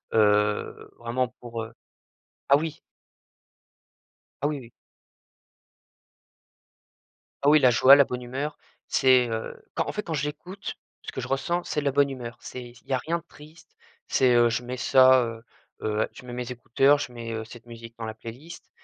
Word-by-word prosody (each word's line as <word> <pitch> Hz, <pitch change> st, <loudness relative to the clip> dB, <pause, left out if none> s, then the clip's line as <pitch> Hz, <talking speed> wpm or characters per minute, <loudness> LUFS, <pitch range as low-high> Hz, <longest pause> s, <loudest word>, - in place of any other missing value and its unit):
heu, 105 Hz, -1 st, +2 dB
vraiment 120 Hz, +1 st, -1 dB
pour, 115 Hz, -2 st, -5 dB
heu 115 Hz, +1 st, -10 dB, 0.8 s
ah 140 Hz, -, +7 dB
oui! 160 Hz, 0 st, -4 dB, 1.7 s
Ah -, -, +3 dB
oui, 150 Hz, -, -3 dB
oui! 120 Hz, -3 st, -12 dB, 2.7 s
Ah -, -, +5 dB
oui, 155 Hz, -, +7 dB
la 130 Hz, -4 st, +5 dB
joie, 130 Hz, +3 st, +8 dB
la 140 Hz, -, +6 dB
bonne 125 Hz, 0 st, -5 dB
humeur, 135 Hz, +5 st, -4 dB, 0.3 s
c'est, 130 Hz, -2 st, +4 dB
heu 110 Hz, 0 st, -5 dB
quand -, -, -1 dB
en -, -, 0 dB
fait, 210 Hz, -, -4 dB
quand 165 Hz, -, -4 dB
j'écoute 150 Hz, +7 st, -5 dB, 0.3 s
ce -, -, -6 dB
que -, -, -5 dB
je -, -, -5 dB
ressens 175 Hz, +6 st, -1 dB
c'est 150 Hz, -, -2 dB
de -, -, -7 dB
la 140 Hz, -, +2 dB
bonne 140 Hz, +1 st, +3 dB
humeur. 125 Hz, -3 st, -7 dB
C'est 125 Hz, -, -8 dB
il 120 Hz, -, -20 dB
y 135 Hz, -, -5 dB
a 130 Hz, -, +3 dB
rien 170 Hz, +5 st, -2 dB
de 165 Hz, -, -16 dB
triste, 155 Hz, +3 st, -17 dB, 0.3 s
c'est, 130 Hz, -2 st, +3 dB
heu, 120 Hz, 0 st, +5 dB
je 120 Hz, +1 st, -1 dB
mets 125 Hz, +1 st, -5 dB
ça, 130 Hz, 0 st, +6 dB
heu 115 Hz, -1 st, -6 dB, 0.4 s
heu, 110 Hz, 0 st, 0 dB
je -, -, -13 dB
mets 125 Hz, -, -8 dB
mes 125 Hz, 0 st, -4 dB
écouteurs, 135 Hz, +4 st, +3 dB
je 145 Hz, -3 st, -4 dB
mets, 115 Hz, -1 st, -6 dB
heu, 110 Hz, -, -3 dB
cette 120 Hz, +1 st, -13 dB
musique 115 Hz, 0 st, -11 dB
dans 115 Hz, -, -5 dB
la 110 Hz, -, -5 dB
playlist 120 Hz, +9 st, -11 dB
125 Hz, 185 wpm, -26 LUFS, 115-145 Hz, 2.7 s, joie